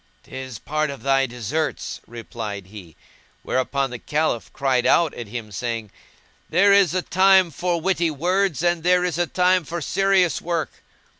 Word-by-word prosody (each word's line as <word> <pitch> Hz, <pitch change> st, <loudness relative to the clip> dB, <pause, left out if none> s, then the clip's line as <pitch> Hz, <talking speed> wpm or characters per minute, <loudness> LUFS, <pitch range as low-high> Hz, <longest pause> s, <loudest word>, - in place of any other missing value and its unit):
"'Tis 130 Hz, -3 st, -8 dB
part 155 Hz, +6 st, -2 dB
of 140 Hz, -, -8 dB
thy 135 Hz, 0 st, +2 dB
deserts,"replied 120 Hz, -5 st, -5 dB
he; 95 Hz, -5 st, -12 dB, 0.5 s
whereupon 135 Hz, +1 st, -1 dB
the 125 Hz, -, -6 dB
Caliph 150 Hz, -9 st, -1 dB
cried 130 Hz, -3 st, +1 dB
out 165 Hz, -3 st, +3 dB
at 120 Hz, -, -7 dB
him 110 Hz, -1 st, -7 dB
saying, 115 Hz, 0 st, -4 dB, 0.6 s
"There 200 Hz, +4 st, +5 dB
is 195 Hz, -4 st, +4 dB
a 185 Hz, -, 0 dB
time 190 Hz, -1 st, +4 dB
for 175 Hz, +3 st, -1 dB
witty 175 Hz, -1 st, +1 dB
words 175 Hz, +2 st, 0 dB
and 175 Hz, -1 st, +1 dB
there 180 Hz, +1 st, +3 dB
is 175 Hz, -2 st, -2 dB
a 175 Hz, -, +1 dB
time 180 Hz, 0 st, +2 dB
for 170 Hz, +3 st, -5 dB
serious 190 Hz, +1 st, +1 dB
work." 170 Hz, -1 st, -2 dB
155 Hz, 155 wpm, -22 LUFS, 125-180 Hz, 0.6 s, There